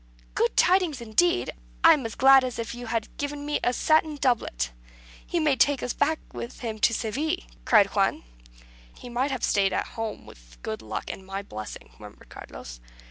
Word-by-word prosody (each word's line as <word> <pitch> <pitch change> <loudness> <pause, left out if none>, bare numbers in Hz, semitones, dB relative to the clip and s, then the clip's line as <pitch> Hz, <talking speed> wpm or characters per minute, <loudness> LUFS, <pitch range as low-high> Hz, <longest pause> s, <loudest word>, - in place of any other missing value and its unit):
"Good 155 - 0
tidings 360 -6 +3
indeed! 340 +11 +1 0.3
I 330 - +9
am 275 -7 -1
as 225 - -9
glad 270 0 +7
as 250 -2 -3
if 230 0 -4
you 240 0 -8
had 225 -2 -3
given 285 0 -4
me 295 0 0
a 245 - +3
satin 310 +3 +2
doublet. 230 - 0 0.5
He 345 - -2
may 300 -4 +3
take 280 0 +2
us 245 - -2
back 310 +2 +1 0.2
with 235 - -7
him 220 -3 -4
to 230 - +4
Seville," 265 +9 -1 0.3
cried 215 -4 +6
Juan. 195 -1 +1 0.7
"He 245 - -10
might 250 +4 0
have 265 -4 -4
stayed 195 -2 +2
at - - -1
home, 225 -1 -5
with - - -16
good 110 - -4
luck 110 0 -5
and 190 - -9
my 195 +1 -5
blessing," 105 - -8
murmured - - -13
Carlos. - - -10
240 Hz, 190 wpm, -26 LUFS, 200-290 Hz, 0.7 s, I